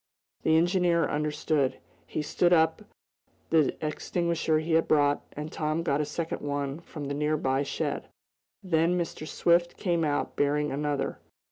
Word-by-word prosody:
The 160 0 +4
engineer 175 -1 +3
understood. 150 -2 0 0.3
He 155 - -3
took 175 +3 +2
up 160 -2 +4 0.7
the 155 -4 +3
extinguisher 165 +1 0
he 160 +2 -2
had 165 0 +3
brought, 145 -1 +3
and 150 +2 -6
Tom 155 +2 -1
got 145 -3 +1
a - - -1
second 160 +3 -4
one 145 0 -2
from 150 -4 -7
a - - 0
nearby 145 -2 0
shed. 140 - -3 0.6
Then 170 -1 +2
Mr. 165 -2 -4
Swift 170 +2 +2
came 170 -3 0
out 145 -2 -1
bearing 150 +1 +1
another. 145 0 -2
155 Hz, 145 wpm, -28 LUFS, 145-170 Hz, 0.7 s, The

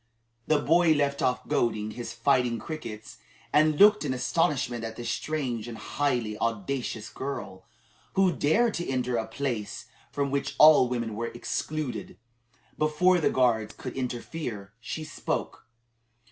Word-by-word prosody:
The 155 - +4
boy 165 +2 +4
left 140 -1 0
off 125 -1 0
goading 110 -2 0
his 115 0 -6
fighting 120 0 +2
crickets, 115 -5 -7 0.3
and 155 0 +4
looked 210 -1 +7
in 130 -3 -1
astonishment 130 -3 0
at 110 0 -5
this 120 - -3
strange 130 -8 -2
and 115 -2 -7
highly 120 -8 -1
audacious 115 0 -2
girl, 130 -9 -6 0.5
who 190 -2 +4
dared 215 +10 +2
to 175 - -3
enter 125 -2 0
a 110 -1 -2
place 115 -3 -4 0.3
from 140 -1 -1
which 140 0 -2
all 150 -5 +8
women 115 -3 -2
were 115 +2 -2
excluded. 125 -1 -4 0.6
Before 175 +4 +3
the 160 - +2
guards 110 -4 +1
could 125 - -7
interfere, 120 -5 -5
she 155 +7 -5
spoke. 155 -5 -4
130 Hz, 140 wpm, -27 LUFS, 115-155 Hz, 0.6 s, all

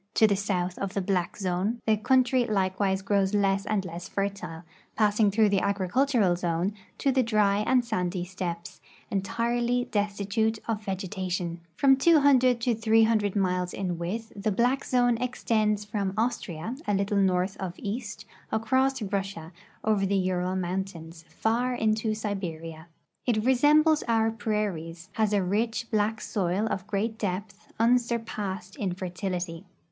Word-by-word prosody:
To 220 - +6
the 205 -2 +3
south 185 -2 -2
of 195 0 -4
the - - +1
black 180 -2 -1
zone 195 +4 -1
the 220 - +4
country 255 +3 +3
likewise 190 -1 0
grows 200 0 +1
less 195 0 +1
and 205 -3 0
less 175 0 -7
fertile, 195 -4 -3 0.3
passing 210 -1 +3
through 215 +1 +3
the 195 -2 +2
agricultural 200 +1 +2
zone 175 +2 -1 0.2
to 275 - +1
the 260 0 +3
dry 210 -4 +2
and 250 -1 +3
sandy 180 -4 -2
steppes, 180 -2 -6 0.3
entirely 235 +4 0
des 205 -1 +2
titute 205 +2 -1
of 220 -2 -2
vegetation. 185 -3 -3
From 270 +6 +5
200 270 -5 +5
to 240 +1 +2
300 220 -2 +3
miles 180 -2 0
in 180 -3 -3
width, 220 +7 -4
the 205 +1 -1
black 245 +6 +1
zone 245 -2 +2
extends 215 -4 0
from 200 -3 -2
Austria, 220 -4 -2
a 205 - +2
little 200 +1 0
north 185 0 +1
of 180 -2 -5
east, 210 +1 -5 0.3
across 260 +3 +1
Russia, 195 -5 -3 0.3
over 210 -3 +2
the 200 - +1
Ural 185 0 0
mountains, 175 -3 -4
far 235 +8 0
into 215 -1 +1
Siberia. 165 -6 -5 0.4
It 220 -2 +1
resembles 300 +4 +5
our 225 -1 +2
])rairies; 195 -6 -3
has 215 0 0
a 200 -2 +2
rich, 225 +5 0
l)lack 215 0 +1
soil 190 +1 -1
of 190 +1 -3
great 220 +2 -2
depth, 205 +2 -4
unsurpassed 230 -4 0
in 195 -8 -1
fertility. 180 -1 -4
205 Hz, 145 wpm, -27 LUFS, 185-225 Hz, 0.4 s, To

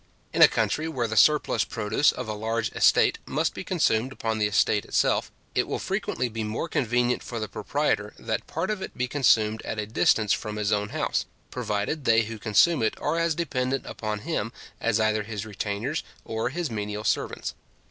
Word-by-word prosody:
In - - +1
a - - +12
country 155 +1 0
where 130 -8 -1
the 110 - -4
surplus 150 +8 +4
produce 105 +7 +1
of 125 - -6
a 110 - -2
large 110 +1 -2
estate - - +4
must - - 0
be - - -6
consumed 115 +4 +1
upon 110 -4 -2
the 105 - +3
estate 105 0 +2
itself, - - +1 0.2
it - - +1
will - - -2
frequently 125 - -2
be 115 -1 -4
more 110 +9 -3
convenient 125 -4 +1
for 120 - -5
the 110 - -3
proprietor, - - -1
that - - -3
part 170 +6 -2
of 210 -3 -3
it - - -7
be 125 0 0
consumed 110 -5 +3
at - - -5
a 105 - -2
distance 110 0 +3
from 105 -2 -3
his 105 -1 -1
own 105 0 +1
house, - - -1 0.3
provided 105 +8 -2
they 115 0 +5
who 110 0 -7
consume 120 +9 +4
it 110 - +1
are 160 +3 0
as 165 -1 +1
dependent 135 -5 -1
upon 105 -1 -4
him 140 -9 -2 0.3
as 115 -1 +1
either 110 0 +2
his 105 0 -5
retainers 105 - -3 0.2
or 110 +2 -2
his 165 -1 -3
menial 105 -1 -3
servants. - - -1
110 Hz, 195 wpm, -26 LUFS, 105-130 Hz, 0.3 s, a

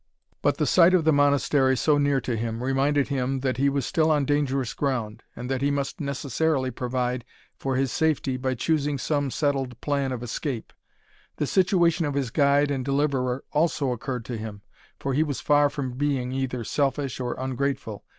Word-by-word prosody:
But - - +2
the - - +1
sight 180 +1 +5
of 175 - +3
the 160 0 +4
Monastery 140 -2 +3
so 145 +3 +3
near 140 -1 +2
to 120 0 -2
him, 115 +1 -3
reminded, 135 +2 +1
him 135 -1 -1
that 130 -1 -1
he 140 +2 +3
was 140 -1 -1
still 160 -3 +2
on 150 -3 +2
dangerous 135 -4 0
ground, 125 -7 -2
and 125 - -6
that 130 0 -2
he 140 - +2
must 140 0 -2
necessarily 140 0 -1
provide 125 0 -2 0.4
for 135 -1 -1
his 130 -1 0
safety 155 -4 +1
by 130 0 -1
choosing 145 +2 0
some 145 +1 -1
settled 135 -4 -1
plan 140 -2 -1
of 125 -2 -4
escape. 120 0 -4 0.6
The - - -1
situation 175 -2 +2
of 145 - -3
his 135 -4 -1
guide 145 +1 +3
and 135 -2 -1
deliverer 135 -2 0
also 150 -3 +1
occurred 125 0 -4
to 120 - -4
him, 105 -2 -7 0.4
for 135 - -2
he 145 - +2
was 145 -4 -1
far 145 0 +4
from 140 -3 -4
being 135 -2 -1
either 130 -2 -2
selfish 135 0 -1
or 125 -1 -2
ungrateful. 130 -4 -3
135 Hz, 185 wpm, -25 LUFS, 125-145 Hz, 0.6 s, sight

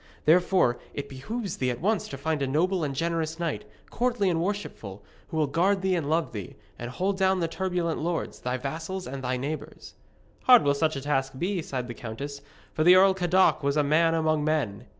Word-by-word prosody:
Therefore 175 -5 +4 0.2
it 140 0 -4
behoves 195 - -5
thee 130 - 0
at 120 -1 -3
once 210 +2 0
to 140 - -7
find 155 +1 -2
a 135 - 0
noble 170 +6 +1
and 140 -2 -2
generous 165 0 -1
knight, 165 -11 -2 0.3
courtly 235 -6 +1
and 165 -1 0
worshipful, 170 - -4 0.2
who 160 - -5
will 155 - +3
guard 185 +7 +1
thee 190 -1 +2
and 160 -5 -1
love 160 +1 +1
thee, 100 -5 -7 0.2
and 120 - -5
hold 190 +9 -2
down 190 0 +3
the 165 - 0
turbulent 175 -1 -2
lords, 170 +2 -3
thy 125 +1 -2
vassals 160 +8 -5
and 135 +1 -6
thy 125 0 -1
neighbours.' 145 +5 -6 0.5
'Hard 250 -2 +8
will 140 - +3
such 155 +2 0
a 135 - -4
task 135 -1 -1
be,' 180 +4 -1
sighed 130 -5 -4
the 120 - -5
countess, 140 +6 -7 0.3
'for 155 - +1
the 180 +2 +8
Earl 190 +1 +6
Cadoc 185 0 +3
was 140 +1 0
a 150 - +4
man 165 +3 +3
among 155 -2 +1
men.' 150 -10 -1
160 Hz, 210 wpm, -27 LUFS, 140-185 Hz, 0.5 s, Hard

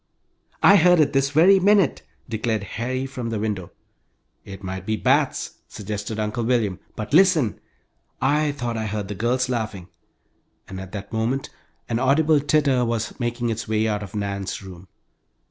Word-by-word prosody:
"I 200 - +8
heard 180 -1 +5
it 145 -2 +3
this 135 0 +2
very 175 +7 +5
minute!" 195 -4 +3 0.3
declared 110 -2 -2
Harry, 125 +6 -3
from 130 -3 -5
the 115 - -2
window. 105 -4 -3 0.7
"It 100 0 -10
might 95 -1 -5
be 110 +3 -1
bats!" - - 0
suggested 105 +1 -5
Uncle 110 +2 -2
William. 110 -6 0 0.2
"But 110 +4 -6
listen! 160 - +4 0.6
I 150 +2 +2
thought 120 -5 -4
I 110 -1 -2
heard 105 -1 -4
the - - -3
girls 125 +5 0
laughing," 110 -7 -4 0.8
and 95 0 -7
at 95 -1 -9
that 100 +1 -7
moment 120 +5 -1 0.4
an 115 0 -1
audible 150 +4 +3
titter 140 -3 +2
was 115 0 -2
making 120 -1 -1
its 110 0 -4
way 110 0 +1
out 105 -1 -1
of 100 0 -8
Nan's 100 -1 -3
room! 95 -1 -11
115 Hz, 165 wpm, -23 LUFS, 105-135 Hz, 0.8 s, I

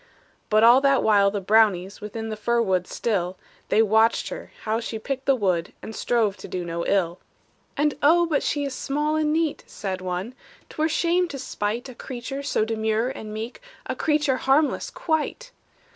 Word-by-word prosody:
But 215 +1 +4
all 240 +3 +7
that 275 -1 +3
while 200 -2 +5
the 205 0 -2
brownies 200 -2 +2
Within 220 +2 -5
the 215 - -3
fir 235 +3 0
wood 185 -5 +1
still, 185 -5 -2 0.3
They 220 - +4
watched 220 +2 +3
her - - -7
how 220 +1 0
she 230 -1 -4
picked 265 +4 -5
the 275 - +5
wood, 185 -7 0
And 220 - -7
strove 225 -5 +1
to - - -9
do 180 -1 -4
no 170 0 -3
ill. 180 -3 +1 0.6
"And, 295 0 +2
oh, 340 +4 +5
but 310 -4 +1
she 290 - -1
is 275 - -4
small 295 +4 -1
and 310 -1 +1
neat," 320 -1 0
Said 190 -3 -5
one; 185 +6 -4 0.4
"'t - - -14
were 315 +1 +2
shame 350 +3 +2
to 285 - -6
spite 225 -1 -3
A 255 - -9
creature 255 +3 -6
so 280 -6 0
demure 220 +1 0
and 220 -5 -7
meek, 225 - -6 0.2
A - - -3
creature 295 -3 +1
harmless 280 +4 +2
quite!" 330 +10 -2
230 Hz, 190 wpm, -24 LUFS, 205-280 Hz, 0.6 s, all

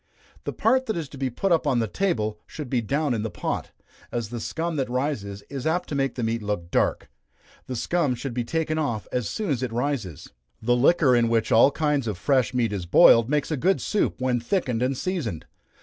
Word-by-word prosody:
The - - -2
part 260 +3 +2
that 220 - -1
is 160 -4 -3
to 140 - -11
be 135 -2 -1
up 170 -5 +3
on 135 -3 +2
the 115 -1 +1
table, 110 - -1
should 150 -5 -7
be 125 -3 +2
down 140 +5 0
in 110 - -1
the 110 - -2
pot, - - -3 0.4
as 120 -3 -3
the 120 0 -5
scum 165 +7 -3
that 130 -3 -1
rises 120 -7 -2
is 135 0 -4
apt 175 +3 0
to - - -4
make 135 -1 0
the 125 - -3
meat 115 0 -1
look 100 -5 -3
dark - - +1 0.6
the 130 - -4
scum 145 +1 0
should 125 +1 -5
be 120 0 -1
taken 155 +4 -1
off 120 -8 -2
as 125 -4 -1
soon 210 -6 -2
as 130 -3 0
it 130 -3 -2
rises. 115 - -3 0.3
The 120 +2 +2
liquor 135 0 +4
in 120 -1 +3
which 115 -1 +1
all 115 +4 +7
kinds 145 -4 0
of 105 -4 -2
fresh 130 +4 +2
meat 120 -4 0
is 90 -4 -4
boiled, 115 +6 +6
makes 150 +1 0
a 155 - 0
good 190 +9 +2
soup, 210 - -1
when 130 -1 +1
thickened 125 - -1
and 130 +1 0
seasoned. 145 - -3
130 Hz, 225 wpm, -25 LUFS, 115-150 Hz, 0.6 s, all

